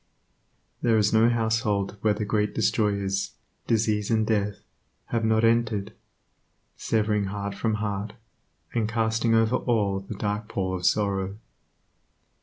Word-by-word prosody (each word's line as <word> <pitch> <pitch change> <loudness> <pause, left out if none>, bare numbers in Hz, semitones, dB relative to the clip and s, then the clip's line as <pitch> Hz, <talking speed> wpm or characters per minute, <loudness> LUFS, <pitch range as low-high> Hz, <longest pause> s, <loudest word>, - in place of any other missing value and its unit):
There 115 -2 +3
is 105 0 +2
no 110 +1 +5
household 110 -4 0
where 105 -1 +2
the 105 - -3
Great 105 0 0
Destroyers, 100 -3 0 0.3
disease 110 -2 +1
and 110 -1 +2
death, 105 -2 -1 0.5
have 115 -1 0
not 110 0 +2
entered, 115 -3 +1 0.8
severing 105 -2 0
heart 100 +1 -4
from 110 +2 -1
heart, 105 -1 -3 0.6
and 110 -2 0
casting 115 0 +1
over 115 +2 +3
all 105 -5 0
the 100 +2 -8
dark 105 +1 -2
pall 95 -3 -2
of 90 -1 0
sorrow. 100 -1 0
105 Hz, 130 wpm, -26 LUFS, 100-110 Hz, 0.8 s, no